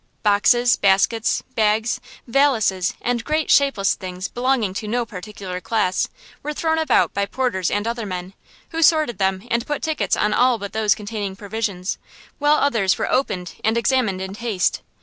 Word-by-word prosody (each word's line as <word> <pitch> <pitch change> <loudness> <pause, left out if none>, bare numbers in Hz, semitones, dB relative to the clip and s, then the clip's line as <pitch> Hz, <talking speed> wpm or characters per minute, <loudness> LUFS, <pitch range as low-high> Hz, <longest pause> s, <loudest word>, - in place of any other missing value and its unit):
Boxes, 240 +4 +4
baskets, 200 +3 +2
bags, 220 +2 +1 0.2
valises, 230 -8 +2
and 240 -1 0
great, 310 +2 0
shapeless 275 -9 +3
things 185 0 -6
belonging 245 -5 0
to 210 +2 -5
no 240 +2 0
particular 190 -2 -7
class, 185 -3 0 0.3
were 300 0 -4
thrown 320 +1 0
about 315 -5 +2
by 200 - 0
porters 205 -7 -1
and 205 +2 -1
other 230 -2 -3
men, 180 0 -5 0.4
who 330 - -2
sorted 310 - +3
them 190 +3 0
and 235 +1 0
put 295 -1 -3
tickets 315 -1 0
on 210 0 +1
all 250 +1 +3
but 200 -1 -7
those 215 -2 +2
containing 205 -2 -5
provisions, 200 -2 -3 0.4
while 295 +1 +4
others 225 -11 +2
were - - -2
opened 185 -9 -1
and 220 +2 +2
examined 235 -6 +1
in 190 0 -6
haste. 210 -4 -1
220 Hz, 165 wpm, -21 LUFS, 195-250 Hz, 0.4 s, Boxes